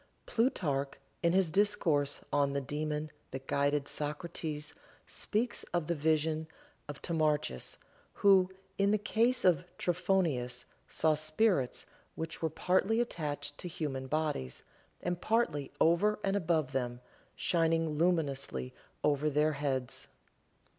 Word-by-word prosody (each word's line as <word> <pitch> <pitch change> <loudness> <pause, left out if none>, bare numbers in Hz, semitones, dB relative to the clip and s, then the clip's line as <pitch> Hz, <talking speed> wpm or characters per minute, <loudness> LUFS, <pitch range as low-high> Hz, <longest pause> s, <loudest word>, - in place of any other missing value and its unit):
Plutarch 150 - 0 0.3
in 170 0 +3
his 185 -3 +3
discourse 155 -7 +2
on 140 -1 +3
the 140 - +1
daemon 150 +2 -3 0.2
that 135 0 -7
guided 145 +1 +1
Socrates 150 0 -4 0.3
speaks 230 +3 -1
of 175 -3 +1
the 170 - 0
vision 155 0 +1 0.4
of 145 -1 -8
Timarchus, 150 - 0 0.4
who, 190 -2 +5 0.3
in 200 0 +4
the 210 - +4
case 230 +4 +1
of 180 -1 +5
Trophonius, 165 -9 0 0.2
saw 160 -1 +2
spirits 155 - +1 0.3
which 160 0 -5
were 160 - +1
partly 190 +8 +2
attached 145 -10 -2
to - - -5
human 140 -6 -3
bodies, 150 - -2 0.4
and 175 0 -2
partly 215 -11 +1
over 185 +6 +4
and 195 0 +1
above 160 -7 +1
them, 125 -2 -2 0.3
shining 165 -2 +1
luminously 140 - 0 0.3
over 150 +1 +2
their 150 +1 +2
heads. 135 -3 -2
155 Hz, 120 wpm, -32 LUFS, 145-180 Hz, 0.4 s, who